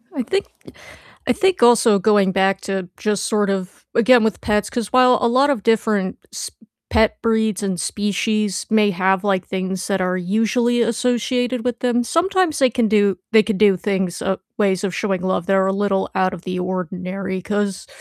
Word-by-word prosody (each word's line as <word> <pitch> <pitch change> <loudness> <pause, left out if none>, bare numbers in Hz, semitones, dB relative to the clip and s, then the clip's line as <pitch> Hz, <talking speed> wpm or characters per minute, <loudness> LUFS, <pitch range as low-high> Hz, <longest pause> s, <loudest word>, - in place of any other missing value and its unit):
I 255 - -1
think 390 - -1 0.8
I - - +3
think 380 -8 +1
also 235 -3 +5
going 200 -1 +3
back 195 0 +1
to 190 -2 -4
just 210 -3 -1
sort 210 -2 0
of 190 -1 -4
again 235 +1 +5
with 220 -2 -1
pets, 210 -2 0
'cause 230 -4 -4
while 250 -1 +5
a 240 - +3
lot 260 +4 +3
of 260 -8 -1
different 210 -4 0 0.2
s - - -6 0.4
pet 220 -1 +2
breeds 220 -3 0
and 190 -3 -2
species 210 0 -2
may 215 -2 +3
have, 190 +1 +1
like, 195 -3 0
things 185 -1 -4
that 195 -2 0
are 180 0 0
usually 225 +6 0
associated 245 +1 -1
with 245 -1 -2
them, 245 -1 +1
sometimes 360 +3 0
they 260 -2 +4
can 240 -1 0
do 205 -3 +2
they 220 -1 +6
can 220 -3 -2
do 205 -2 +4
things 190 -2 -2
uh, 190 0 0 0.2
ways 195 -3 +1
of 195 -3 -2
showing 195 -4 -2
love 185 -2 -1
that 195 - +2
are 190 0 +2
a 195 - 0
little 195 -1 -1
out 185 0 +1
of 180 -2 -9
the 180 -1 -4
ordinary, 185 +1 -4
'cause 205 0 -3
205 Hz, 190 wpm, -20 LUFS, 190-235 Hz, 0.8 s, they